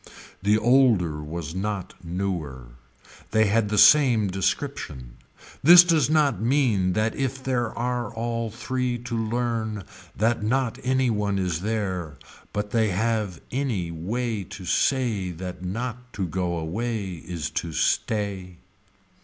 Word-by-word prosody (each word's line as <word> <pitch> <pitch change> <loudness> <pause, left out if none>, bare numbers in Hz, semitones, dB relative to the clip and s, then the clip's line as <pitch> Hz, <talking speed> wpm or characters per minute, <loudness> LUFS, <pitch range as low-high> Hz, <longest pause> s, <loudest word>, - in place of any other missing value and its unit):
The 105 +2 +3
older 110 - +3
was 80 0 -6
not 100 0 -3
newer. 85 -8 -4 0.6
They 110 0 +3
had 105 +1 +2
the 105 - -1
same 120 -5 +6
description. 65 -9 -3 0.4
This 175 +4 +10
does 160 -6 +2
not 145 - +2
mean 115 -7 +2
that 110 +2 +1
if 130 -1 -3
there 120 -3 0
are 120 0 -2
all 115 0 -2
three 125 +2 -2
to 120 0 -5
learn 115 -2 -2 0.3
that 115 +2 +1
not 125 +2 0
any 130 -1 +1
one 105 -2 0
is 90 -3 -1
there 95 -8 -3 0.3
but 105 0 -3
they 110 -1 +2
have 105 -2 -1
any 120 -11 -1
way 105 +6 -3
to 95 - -9
say 115 -4 +1
that 90 +1 -7
not 125 +6 -5
to 95 - -2
go 90 0 -2
away 100 +3 -3
is 85 -3 -4
to 85 - -7
stay. 95 0 -1
110 Hz, 135 wpm, -25 LUFS, 90-120 Hz, 0.6 s, This